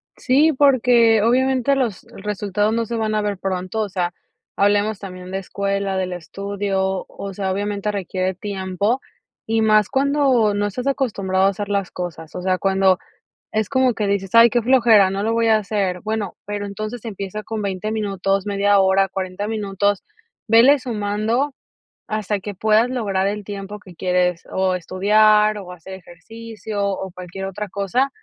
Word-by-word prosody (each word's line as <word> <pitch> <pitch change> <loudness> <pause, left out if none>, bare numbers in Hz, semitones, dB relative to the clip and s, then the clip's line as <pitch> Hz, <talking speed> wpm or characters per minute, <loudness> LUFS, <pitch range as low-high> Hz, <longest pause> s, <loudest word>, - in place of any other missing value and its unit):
Sí, 285 +5 +3
porque 245 -5 +4
obviamente 260 +3 +2
los 245 -7 -1 0.2
resultados 210 +1 -1
no 230 0 0
se 235 - -4
van 220 -1 -1
a 215 - +1
ver 205 -2 -2
pronto, 185 +3 -3
o 210 - -2
sea, 180 -2 -2 0.4
hablemos 205 +1 +2
también 185 -2 -9
de 190 - -2
escuela, 200 0 -2
del 185 -1 -2
estudio, 190 +1 -3
o 200 -1 -7
sea, 190 0 -2
obviamente 205 +1 -2
requiere 185 -1 -2
tiempo 200 +4 -2 0.5
y 225 0 +1
más 215 -2 +4
cuando 270 -5 +2
no 205 0 0
estás 245 +6 -4
acostumbrado 200 -9 0
a 195 - +5
hacer 200 +1 -5
las 200 -2 -1
cosas, 165 -3 -6
o 180 - -4
sea, 185 0 +1
cuando 190 -1 +3 0.5
es 215 -1 0
como 260 -3 +2
que 210 - -1
dices: 200 -1 -1
"Ay, 230 0 +8
qué 240 - +2
flojera, 230 -5 +5
no 195 +1 -2
lo 225 - 0
voy 230 0 +2
a 220 -1 +5
hacer". 195 -4 -2
Bueno, 215 -2 -3
pero 205 0 -4
entonces 215 +3 -6
empieza 200 -1 -5
con 215 0 -5
20 200 +2 -3
minutos, 195 -2 -1
media 200 0 +2
hora, 195 0 +3
40 190 +1 -4
minutos, 205 -2 -1 0.4
ve 235 +6 +6
sumando 230 +3 -1 0.5
hasta 215 -2 -2
que 205 +1 -7
puedas 220 +4 +3
lograr 200 -6 -1
el 205 +1 -3
tiempo 200 0 -7
que 185 -4 -15
quieres 180 -1 0
o 190 -1 +1
estudiar 210 +4 +3
o 185 -2 -9
hacer 180 +1 -10
ejercicio 205 +4 -7
o 190 -2 -2
cualquier 180 +2 -7
otra 200 +2 -5
cosa 200 +8 0
205 Hz, 170 wpm, -21 LUFS, 190-220 Hz, 0.5 s, Ay